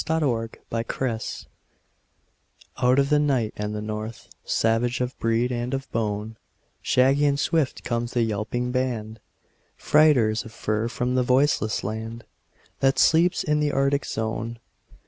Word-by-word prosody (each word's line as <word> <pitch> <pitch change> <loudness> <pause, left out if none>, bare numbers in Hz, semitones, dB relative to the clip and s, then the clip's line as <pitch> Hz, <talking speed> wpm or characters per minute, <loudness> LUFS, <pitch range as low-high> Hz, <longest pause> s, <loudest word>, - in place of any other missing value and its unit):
THE 160 +1 0
TRAIN 115 -4 -2 0.2
DOGS 110 0 -5 1.4
Out 125 +1 +4
of 140 0 +3
the 150 - +5
night 130 -7 +1
and 105 0 -3
the 105 - -4
north; 110 +1 -6
Savage 115 +2 +1
of 125 +1 -2
breed 115 +2 +1
and 120 +2 -2
of 135 0 -6
bone, 110 0 -2 0.4
Shaggy 135 +3 +3
and 140 0 +1
swift 155 -3 0
comes 120 0 -2
the 120 -2 +2
yelping 115 +3 -2
band, 115 -4 -2 0.6
Freighters 130 -8 +3
of 115 - -11
fur 110 +1 -1
from 125 +2 -2
the 130 - +3
voiceless 125 -4 +2
land 110 +3 -5 0.6
That 135 0 +2
sleeps 170 +3 +4
in 150 0 +1
the 150 -1 +1
Arctic 140 +1 +1
zone. 115 +1 -3
120 Hz, 145 wpm, -24 LUFS, 110-135 Hz, 1.4 s, the